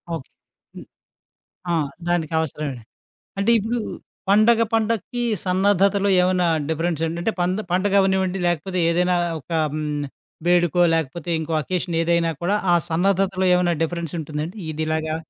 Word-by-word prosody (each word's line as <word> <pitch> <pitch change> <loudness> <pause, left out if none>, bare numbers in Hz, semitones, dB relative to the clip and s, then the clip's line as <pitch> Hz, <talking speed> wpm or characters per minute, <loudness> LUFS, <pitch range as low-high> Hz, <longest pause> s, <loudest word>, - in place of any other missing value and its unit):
Okay. 135 - -9 0.5
హ్మ్. - - -10 0.9
ఆ! - - +2 0.3
దానికవసరమే. 160 -5 -1 0.6
అంటే, 200 +4 +2
ఇప్పుడు 230 +4 -2 0.5
పండగ, 220 +3 +5
పండగకి 230 +2 0 0.2
సన్నద్ధతలో 200 +2 +2
ఏమన్నా 180 0 +2 0.2
డిఫరెన్స్ 165 0 -1
ఏంటంటే 170 +6 -2
పంద 180 +2 0
పండగవ్వనివ్వండి 190 0 +2
లేకపోతే 180 +2 -1
ఏదైనా 180 +1 +2 0.2
ఒక 150 - -17 0.2
హ్మ్. 150 -1 -2 0.4
వేడుకో, 175 -1 +3
లేకపోతే 165 +1 -2
ఇంకో 160 +1 -4
అకేషనేదైనా 170 0 0
కూడా 185 +4 +1 0.2
ఆ - - +5 0.2
సన్నద్ధతలో 190 +2 +1
ఏమైనా 180 -1 +2
డిఫరెన్స్ 170 0 -3
ఉంటుందా 150 -1 -4
అండి? 180 +7 -9
ఇదిలాగా 155 0 -2
175 Hz, 120 wpm, -22 LUFS, 160-195 Hz, 0.9 s, పండగ